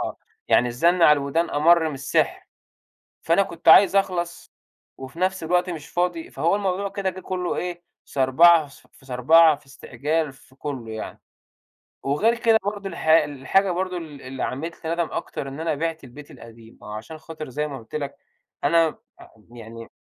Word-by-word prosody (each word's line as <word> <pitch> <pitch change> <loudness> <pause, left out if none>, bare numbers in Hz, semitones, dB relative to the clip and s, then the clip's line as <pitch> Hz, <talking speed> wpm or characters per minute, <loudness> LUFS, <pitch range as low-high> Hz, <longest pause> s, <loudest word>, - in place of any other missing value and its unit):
آه، - - -4 0.3
يعني 125 - +4
الزن 150 +9 +2
على 150 - +8
الودان 150 +4 0
أمَر 160 +2 +4
من 150 - -5
السِحر، 140 +1 -1 0.8
فأنا 170 +4 +3
كنت 170 -3 -4
عايز 200 0 +8
أخلص، 175 -3 -1 0.5
وفي 135 +4 -10
نفْس 185 0 0
الوقت 180 +2 +1
مش 155 -4 -7
فاضي، 175 -2 -2
فهو 170 +5 +1
الموضوع 200 0 -1
كده 195 -1 -2
جه 185 +1 -10
كلّه 180 -1 -3
إيه، 175 -1 -4 0.2
صربعة، 155 +5 +4
في 135 -1 -20
صربعة، 155 +5 +5
في 140 - -24
استعجال 145 +3 -3
في 130 0 -22
كلّه 130 -5 -6
يعني، 110 - -7 0.8
وغير 205 +13 +2
كده 225 -2 +4
برضه 205 -1 -3
الحا 160 -3 +3
الحاجة 145 +7 0
برضه 185 +1 -2
ال 155 -5 -8
اللي 130 +1 -6
عملت 165 +6 -5
لي 160 - -1
ندم 170 -1 -1
أكتر 135 - -5
إن 140 +3 -8
أنا 165 -1 -1
بِعت 160 0 -3
البيت 140 +4 -13
القديم، 115 0 -15
عشان 110 +9 -8
خاطر 155 -2 -9
زي 150 +4 -3
ما 140 -2 -7
قلت 115 +3 -16
لك، 140 -2 -4 0.5
أنا 165 +5 +2 0.5
يعني 115 -1 -10
160 Hz, 170 wpm, -23 LUFS, 135-175 Hz, 0.8 s, على